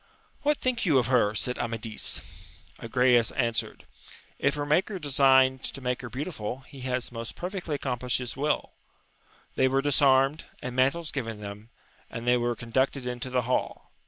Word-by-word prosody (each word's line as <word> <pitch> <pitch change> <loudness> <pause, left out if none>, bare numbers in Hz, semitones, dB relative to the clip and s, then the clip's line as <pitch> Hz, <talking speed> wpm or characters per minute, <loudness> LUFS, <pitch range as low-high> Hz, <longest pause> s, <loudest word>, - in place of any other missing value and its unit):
What 295 0 +2
think 255 -2 -1
you 155 -8 +4
of 125 - +3
her? 115 -4 +3
said 125 +4 -1
Amadis. 115 -1 -3 0.6
Agrayes 120 0 +3
answered, 115 -4 -1 0.5
If 140 +1 +2
her 145 0 -2
Maker 185 +7 +1
de 150 -5 -6
signed 130 -1 +5
to - - -5
make 125 -1 -2
her 125 - -7
beautiful, 130 - -4
he 135 +1 -13
has 125 -1 -2
most 115 -1 -6
perfectly 180 -4 -3
accompUshed 125 -2 -1
his 125 -2 -5
will. 150 +3 0 0.8
They 130 - +3
were 135 +1 +1
disarmed, 135 0 +3
and 125 -1 -5
mantles 140 +5 +2
given 115 -6 -4
them, 105 +2 -8 0.4
and 115 - -6
they 125 0 +5
were 120 0 0
conducted 130 +3 -1
into 125 +1 -4
the 125 -1 +1
hall. 125 +2 -2
130 Hz, 165 wpm, -27 LUFS, 120-140 Hz, 0.8 s, signed